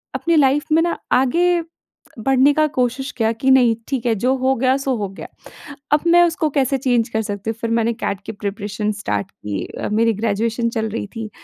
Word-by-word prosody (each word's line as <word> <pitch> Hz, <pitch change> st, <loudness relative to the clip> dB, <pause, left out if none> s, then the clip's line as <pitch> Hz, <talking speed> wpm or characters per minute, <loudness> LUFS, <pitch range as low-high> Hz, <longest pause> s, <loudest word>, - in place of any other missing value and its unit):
अपनी 335 Hz, -1 st, +1 dB
लाइफ़ 285 Hz, +2 st, +3 dB
में 325 Hz, -, +5 dB
ना 345 Hz, -, -1 dB, 0.2 s
आगे, 340 Hz, +7 st, +3 dB, 0.6 s
बढ़ने 270 Hz, +4 st, +3 dB
का 310 Hz, 0 st, +3 dB
कोशिश 255 Hz, +3 st, 0 dB
किया 225 Hz, 0 st, +2 dB
कि 260 Hz, +4 st, 0 dB
नहीं, 245 Hz, -3 st, +5 dB
ठीक 260 Hz, -4 st, -2 dB
है 230 Hz, -, +3 dB
जो 250 Hz, +6 st, +1 dB
हो 260 Hz, +1 st, +1 dB
गया 260 Hz, +2 st, +2 dB
सो 270 Hz, -1 st, -1 dB
हो 205 Hz, -2 st, -3 dB
गया। 195 Hz, -, -10 dB, 0.7 s
अब 295 Hz, -, +4 dB
मैं 345 Hz, +1 st, +6 dB
उसको 325 Hz, -2 st, +1 dB
कैसे 270 Hz, 0 st, +2 dB
चेंज 245 Hz, -3 st, +1 dB
कर 220 Hz, 0 st, -1 dB
सकती 205 Hz, 0 st, -5 dB
हूँ। -, -, -8 dB
फिर 230 Hz, -, -2 dB
मैंने 230 Hz, 0 st, +1 dB
कैट 200 Hz, -3 st, -4 dB
की -, -, -4 dB
प्रिपरेशन 205 Hz, 0 st, -3 dB
स्टार्ट 195 Hz, 0 st, -2 dB
की 100 Hz, -2 st, -5 dB
अ, -, -, -6 dB
मेरी 225 Hz, +1 st, +2 dB
ग्रेजुएशन 225 Hz, +2 st, -1 dB
चल 220 Hz, -1 st, -2 dB
रही 215 Hz, -1 st, -4 dB
थी। 225 Hz, -1 st, -5 dB
235 Hz, 210 wpm, -20 LUFS, 220-270 Hz, 0.7 s, मैं